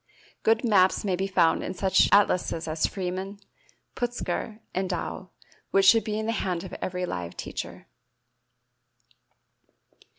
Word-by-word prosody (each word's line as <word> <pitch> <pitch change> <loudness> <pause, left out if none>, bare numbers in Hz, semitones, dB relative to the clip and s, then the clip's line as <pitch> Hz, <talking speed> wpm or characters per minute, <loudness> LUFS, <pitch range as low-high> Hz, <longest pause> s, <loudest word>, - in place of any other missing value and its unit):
Good 225 +2 +2
maps 200 -4 +3
may 190 -2 +1
be 190 +2 -1
found 175 -4 +3
in 185 - -4
such 190 +1 +3
atlases 180 -4 +2
as 155 0 0
Freeman, 190 +1 -4 0.6
Putzger, 240 -2 -3
and 190 0 -1
Dow, 185 +1 -4 0.4
which 195 0 +3
should 225 +4 +7
be 215 -1 -2
in 220 - -2
the 225 - 0
hands 185 -6 -2
of 190 - -9
every 180 0 -2
live 90 - -5
teacher. - - -6
190 Hz, 135 wpm, -26 LUFS, 180-210 Hz, 0.6 s, should